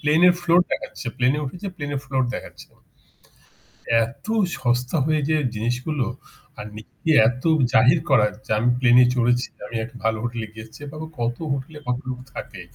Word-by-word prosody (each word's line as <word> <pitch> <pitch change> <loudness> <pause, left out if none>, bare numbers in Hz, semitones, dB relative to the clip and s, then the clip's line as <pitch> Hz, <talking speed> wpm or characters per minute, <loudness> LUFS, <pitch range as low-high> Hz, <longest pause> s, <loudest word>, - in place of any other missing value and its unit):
Plane 150 +3 +3
এর 175 - +5
floor 175 +1 +5
দেখাচ্ছে। - - -4
প্লেনে 130 +4 +2
উঠেছে 180 +9 -6
প্লেন 145 -3 -4
ফ্লোর 135 -1 0
দেখাচ্ছে। - - -8 1.4
এত 135 - -9 0.3
সস্তা 125 +3 0
হয়ে 155 -1 +2
যে 155 - +3 0.2
জিনিসগুলো 125 +5 -1 0.5
আর 105 - -6
নিজেকে 110 +8 -8
এ - - +8
এত 125 +2 -2 0.3
জাহির 120 +4 +6
করা 130 -6 +5 0.2
যে - - -7
আমি 120 +3 +2
প্লেনে 125 0 +6
চড়েছি। 120 +1 +2 0.2
আমি 110 - -8
একটা 120 +3 -9
ভালো 110 0 +2
হোটেলে 120 -2 -3
গিয়েছি। 110 0 -11
বা - - -11 0.2
কত 120 0 -1
হোটেলে 140 +3 -4
কত 125 0 +1
লোক 125 -1 -4 0.2
থাকে। - - -7
125 Hz, 165 wpm, -23 LUFS, 120-145 Hz, 1.4 s, এ